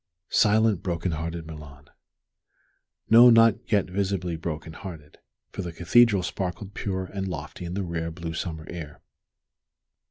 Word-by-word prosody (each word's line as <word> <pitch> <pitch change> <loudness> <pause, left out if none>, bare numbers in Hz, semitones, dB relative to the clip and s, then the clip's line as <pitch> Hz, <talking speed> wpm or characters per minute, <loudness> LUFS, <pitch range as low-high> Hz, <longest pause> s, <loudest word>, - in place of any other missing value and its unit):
Silent, 110 -2 +3
broken 85 0 -2
hearted 80 +1 -4
Milan! 75 -3 -11 1.2
No, 120 +2 +8
not 115 0 +4
yet 100 -3 +3
visibly 95 -2 -2
broken 80 0 -5
hearted, 80 -6 -10 0.3
for - - -5
the 90 -2 -5
Cathedral 100 +4 +4
sparkled 95 +2 -4
pure 95 -2 -3
and 95 +1 -5
lofty 80 0 -6
in 85 +1 -5
the 100 - -1
rare, 85 -2 -3
blue 80 0 -6
summer 80 -1 -5
air. 80 -4 -8
90 Hz, 135 wpm, -26 LUFS, 80-100 Hz, 1.2 s, No